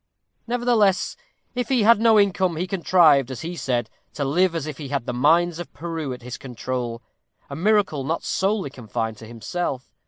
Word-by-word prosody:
Nevertheless, 235 -5 +2 0.4
if 245 -2 -3
he 255 -5 +3
had 230 0 +6
no 225 -1 +5
income, 190 -3 +2
he 170 +3 -2
contrived, 170 -7 +4
as 130 -3 -6
he 170 +2 -5
said, 120 -7 -1 0.3
to 145 - -2
live 170 +5 +2
as 160 -3 -2
if 155 -2 -7
he 145 - -6
had 135 -3 -2
the - - -3
mines 165 +6 +3
of 175 - -7
Peru 165 -4 -4
at 125 -1 -7
his 125 0 -7
control 125 -2 -4 0.5
a - - -4
miracle 190 -4 +2
not 160 +5 -2
solely 195 -6 0
confined 115 -3 -4
to 110 - -11
himself. 130 - -4
160 Hz, 185 wpm, -23 LUFS, 130-190 Hz, 0.5 s, had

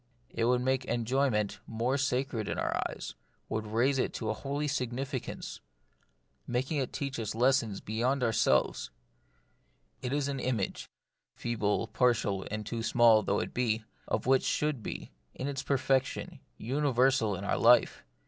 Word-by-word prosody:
It 115 - 0
would 125 +1 +3
make 130 0 +1
enjoyment 120 -2 0
more 115 +4 0
sacred 130 -4 -1
in - - -2
our - - 0
eyes, - - -7 0.4
would 110 0 -2
raise 125 +5 +2
it - - -1
to 110 -2 -2
a - - 0
holy 140 +5 -3
significance, 130 -1 -3 0.9
making 130 +5 -1
it 130 - -2
teach 140 -3 -3
us 110 -1 -3
lessons 120 -4 +2
beyond 125 +5 0
itself. 70 - +2 1.1
It 125 - -3
is 145 0 0
an 140 -1 -2
image 125 -6 -2 0.2
— - - -57
feeble, 110 -2 0
partial, 110 -5 +1
and 105 0 -4
too 115 +2 -3
small 115 -1 +5
though 100 0 0
it - - -5
be 115 -3 0
— - - -35
of - - -1
that - - -2
which 135 - +4
should 150 -5 0
be, - - -6 0.2
in 130 - -3
its 140 -2 -2
perfection, 130 -1 0 0.2
universal 130 -4 +2
in 95 - -6
our - - 0
life. 120 +1 +5
125 Hz, 160 wpm, -30 LUFS, 110-135 Hz, 1.1 s, small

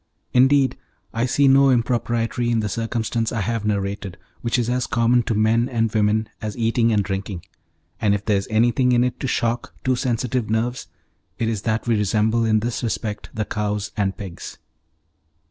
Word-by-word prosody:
Indeed, 135 +1 +4 0.4
I 115 +2 0
see 140 +3 +3
no 135 +1 +6
impropriety 120 -1 0
in 115 -2 +1
the 105 - -2
circumstance 115 +1 -2
I 115 - -1
have 115 +1 -2
narrated, 100 -3 -2 0.2
which 115 +1 0
is 120 -2 0
as 125 0 0
common 120 +1 +3
to 115 - -2
men 115 +3 +2
and 115 -3 0
women 110 0 +2
as 110 0 -5
eating 115 0 +2
and 105 -2 +2
drinking; 95 -2 -4 0.6
and 105 -2 +2
if 105 - -5
there 105 -2 +2
is 95 - -3
anything 120 +3 +3
in 120 0 +4
it 125 - -2
to 135 - -2
shock 120 -1 -1
too 130 -1 +2
sensitive 125 -2 -1
nerves, 115 +3 -1 0.5
it 115 - -1
is 110 -3 -1
that 110 +1 -1
we 120 -1 +2
resemble 110 +3 +1
in 110 -1 +2
this 120 +1 -2
respect 110 -3 -3
the 110 -1 -1
cows 105 -1 -2
and 100 -3 -1
pigs. 95 -5 -8
115 Hz, 180 wpm, -22 LUFS, 105-120 Hz, 0.6 s, no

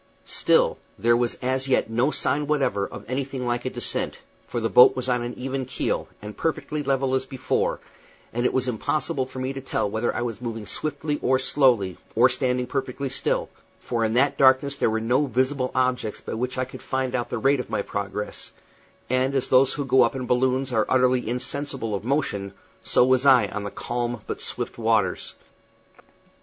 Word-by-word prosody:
Still, - - +2 0.2
there 120 0 +3
was 120 0 0
as 130 +1 +1
yet 130 - +2
no 120 +5 +1
sign 145 0 +1
whatever 140 -9 0
of - - -10
anything 130 0 -3
like 120 0 -1
a - - 0
descent, - - 0 0.3
for 120 - -3
the 115 - 0
boat 125 +3 +7
was 130 0 -2
on 125 -1 +1
even 135 +1 -3
keel, 125 0 -2 0.2
and 105 -1 -7
perfectly 155 0 -2
level 135 -1 0
as 130 0 0
before, 130 -2 -1 0.5
and 120 +1 -1
it - - +2
was 130 0 0
impossible 130 +2 -1
for 130 - -11
me 130 +1 -2
to 135 - -6
tell 130 - -1
whether 110 +3 -1
I 120 - -1
was 115 -2 -4
moving 115 -3 -5
swiftly 150 +4 -2
or 130 +1 +3
slowly, 125 -9 +2 0.2
or 120 +3 +6
standing 125 -1 0
perfectly 135 +1 -3
still; - - -1 0.3
for 115 -2 -2
in 110 +1 0
that 140 +3 +2
darkness 135 +1 +4
there 140 - +1
were 110 0 0
no 125 +6 +1
visible 130 0 0
objects 125 -4 0
by - - -7
which 125 +3 -3
I 130 - 0
could 130 - -11
find 130 -1 -2
out 120 -1 -1
the 120 - -2
rate 135 +4 +2
of 125 - -5
my 100 - -1
progress; 100 +1 -4 0.5
and 130 +2 +1
as 135 - 0
those 130 +1 +4
who 145 - -3
go 130 0 +4
up 115 - +3
in 130 -1 -3
balloons 130 +1 +1
are 110 -2 +2
utterly 125 -2 +2
insensible 125 -2 -2
of 100 - -3
motion, 115 -7 -1 0.3
so - - +4
was 130 +1 +3
I 130 -3 +6
on 105 -1 -5
those 100 - -6
calm 120 -1 -3
but - - -5
swift - - -4
waters. - - 0
130 Hz, 195 wpm, -24 LUFS, 120-135 Hz, 0.5 s, boat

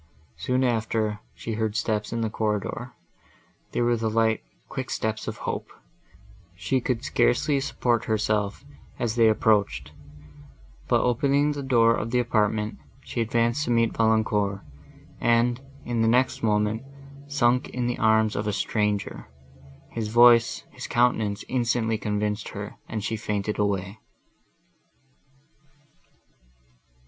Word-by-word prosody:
Soon 130 +1 0
after, 110 -3 0 0.2
she 115 - -5
heard 110 -1 -1
steps 105 -2 -1
in 115 0 -2
the 110 - 0
corridor;—they 105 +2 -5
were 120 0 +3
the 115 -1 -1
light, 110 0 +2 0.3
quick - - -5
steps 110 0 -2
of - - -4
hope; - - -4 0.8
she 95 +9 0
could 120 -2 -1
scarcely 125 +4 +2
support 120 -3 0
herself, 105 +1 -1 0.3
as 115 -2 -1
they 115 -2 +5
approached, 100 - +1 1.0
but - - +3
opening 140 +4 +2
the 145 -1 -4
door 120 -4 +4
of 110 0 -2
the 125 - +1
apartment, 110 -3 0 0.3
she 120 - -3
advanced 115 +4 +1
to - - -4
meet 115 -1 +2
Valancourt, 110 -3 +1 0.6
and, 120 +1 +2 0.2
in 120 -1 -1
the 115 - +3
next 125 +3 +2
moment, 105 0 +1 0.5
sunk 125 -3 +2
in 125 -1 -3
the 120 0 -2
arms 110 -1 +3
of 105 +1 -2
a 105 - 0
stranger. 105 -2 -1 0.6
His 115 -2 -3
voice—his 120 +1 +4
countenance 110 -4 +1
instantly 115 -3 0
convinced 105 0 -2
her, 105 +1 -7 0.2
and 110 -2 -3
she 110 - -1
fainted 105 -1 -3
away. 100 0 -1
110 Hz, 125 wpm, -25 LUFS, 105-120 Hz, 1.0 s, they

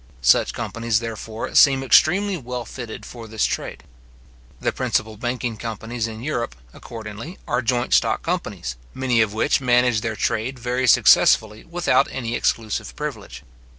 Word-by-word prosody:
Such - - +4
companies, 115 -1 -1
therefore, 115 -1 -6
seem 135 -2 +6
extremely 190 +9 +4
well 125 -5 -5
fitted 120 -1 -8
for 115 -2 -10
this 110 0 0
trade. - - -4 0.8
The - - 0
principal 110 0 -1
banking 120 0 -3
companies 115 +1 -4
in 110 +1 -8
Europe, 120 - -2 0.2
accordingly, 115 - -9
are 120 +1 0
joint 120 0 0
stock - - +2
companies, 60 0 -3 0.2
many 125 -3 +2
of 110 -1 0
which 110 - +2
manage 125 -3 +3
their 115 -1 -3
trade 115 +5 -1
very 125 +1 -1
successfully 110 -1 +5
without 175 +1 +2
any 120 -3 -4
exclusive 110 - -1
privilege. - - -6
120 Hz, 145 wpm, -22 LUFS, 110-125 Hz, 0.8 s, seem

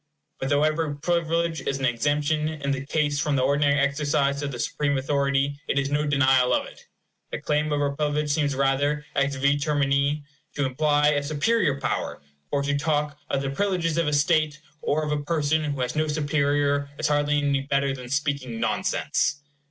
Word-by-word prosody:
But 135 - -2
though 145 +1 +3
every 155 -1 0
privilege 165 +1 0
is 135 - -2
an 135 - -1
exemption, 145 +5 +1
in 145 -3 -3
the 135 -1 -2
case, 145 0 0
from 150 -1 0
the 130 - +2
ordinary 140 +1 +2
exercise 140 0 +1
of 145 -1 -3
the 125 - -6
supreme 145 +3 -1
authority, 140 +1 0
it - - -1
is 140 0 0
no 150 +1 +1
denial 135 -3 +3
of - - -1
it. - - -14 0.4
The - - -4
claim 150 0 0
of 145 0 0
a 140 - +1
privilege 150 0 0
seems 145 -2 +1
rather, 140 +2 +1
ex 140 0 +1
vi 140 +2 +2
termini, 140 0 +1 0.3
to 145 - 0
imply 150 +2 +2
a 145 -1 +1
superior 150 +1 +1
power; - - -2 0.3
for 140 - 0
to 145 0 0
talk 150 0 -1
of 140 - 0
the 135 - -2
privileges 170 -1 0
of 165 - +1
a 150 - 0
state 155 0 +2 0.2
or 155 +2 0
of 150 - -3
a 145 -1 -1
person 155 0 +1
who 140 -3 -3
has 125 0 -2
no 155 0 +1
superior 145 -1 +1
is 155 - 0
hardly 145 0 +2
any 140 -1 +1
better 140 0 0
than 125 -2 -8
speaking 140 -4 -2
nonsense. 145 +4 0
145 Hz, 190 wpm, -25 LUFS, 140-150 Hz, 0.4 s, though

